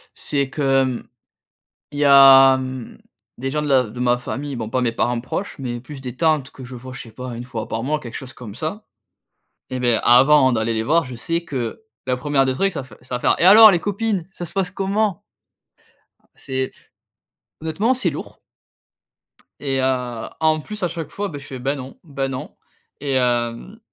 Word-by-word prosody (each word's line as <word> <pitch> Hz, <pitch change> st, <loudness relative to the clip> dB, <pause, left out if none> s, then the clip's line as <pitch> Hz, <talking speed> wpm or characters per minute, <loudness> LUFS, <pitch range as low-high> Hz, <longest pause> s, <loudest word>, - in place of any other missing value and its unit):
C'est 140 Hz, -2 st, -1 dB
que 150 Hz, -, -5 dB, 0.2 s
hem, 130 Hz, -2 st, -2 dB, 0.8 s
il 145 Hz, -, -6 dB
y 150 Hz, -, +3 dB
a, 135 Hz, -1 st, +8 dB
mmh, 130 Hz, -2 st, -6 dB, 0.4 s
des 135 Hz, +2 st, -3 dB
gens 150 Hz, +1 st, -1 dB
de 150 Hz, -, -3 dB
la 135 Hz, -2 st, +4 dB
de 120 Hz, +1 st, -9 dB
ma 125 Hz, 0 st, +2 dB
famille, 140 Hz, +3 st, -5 dB
bon, 110 Hz, -3 st, -4 dB
pas 130 Hz, +2 st, 0 dB
mes 120 Hz, -, +1 dB
parents 120 Hz, +1 st, 0 dB
proches, 190 Hz, +10 st, -5 dB
mais 120 Hz, -2 st, -4 dB
plus 135 Hz, +1 st, -10 dB
des 125 Hz, -2 st, -7 dB
tantes 155 Hz, -4 st, +1 dB
que 135 Hz, -, -11 dB
je 125 Hz, -, -9 dB
vois, 130 Hz, +1 st, -9 dB
je -, -, -8 dB
ne -, -, -8 dB
sais 110 Hz, -, -31 dB
pas, 125 Hz, -1 st, -6 dB
1 120 Hz, -, -6 dB
fois 115 Hz, -3 st, -5 dB
par 115 Hz, +1 st, -3 dB
mois, 150 Hz, +3 st, 0 dB
quelque 120 Hz, -5 st, -9 dB
chose 130 Hz, -1 st, -7 dB
comme 110 Hz, -5 st, -10 dB
ça. 180 Hz, -, -5 dB, 0.8 s
Et 130 Hz, -, -4 dB
beh, 120 Hz, -2 st, +2 dB
avant 130 Hz, +2 st, +6 dB
d'aller 110 Hz, 0 st, 0 dB
les 110 Hz, 0 st, -1 dB
voir, 160 Hz, +6 st, +2 dB
je 125 Hz, -2 st, -8 dB
sais 165 Hz, +7 st, -2 dB
que 130 Hz, -, -4 dB, 0.2 s
la 125 Hz, -1 st, +1 dB
1e 140 Hz, 0 st, +1 dB
des 130 Hz, -, +1 dB
trucs 195 Hz, +8 st, 0 dB
ça 145 Hz, -, -4 dB
fai 120 Hz, -4 st, -15 dB
ça 125 Hz, 0 st, -6 dB
va -, -, -2 dB
faire: -, -, +3 dB
«Et -, -, +3 dB
alors 215 Hz, +3 st, +10 dB
les 175 Hz, -, +2 dB
copines, 205 Hz, -2 st, -2 dB
ça 175 Hz, -, -6 dB
se -, -, -10 dB
passe 190 Hz, -2 st, -1 dB
comment?» 195 Hz, 0 st, -1 dB, 1.1 s
c'est 130 Hz, 0 st, -4 dB, 0.9 s
honnêtement, 195 Hz, +10 st, 0 dB
c'est 220 Hz, -9 st, 0 dB
lourd 145 Hz, -, -8 dB, 1.2 s
et 135 Hz, -2 st, -1 dB
heu, 125 Hz, -3 st, -1 dB
en 155 Hz, -1 st, +2 dB
plus 210 Hz, +3 st, -7 dB
à 180 Hz, -, +3 dB
chaque 165 Hz, -2 st, -6 dB
fois 205 Hz, 0 st, -4 dB
beh, 145 Hz, -, -7 dB
je 140 Hz, -, -12 dB
fais: 130 Hz, -2 st, -7 dB
«Ben 135 Hz, +3 st, -1 dB
non, 130 Hz, -1 st, -9 dB
ben 140 Hz, -4 st, -3 dB
non 130 Hz, -1 st, -6 dB, 0.5 s
et 140 Hz, -1 st, -2 dB
hem» 120 Hz, -, -1 dB
135 Hz, 210 wpm, -21 LUFS, 125-160 Hz, 1.2 s, alors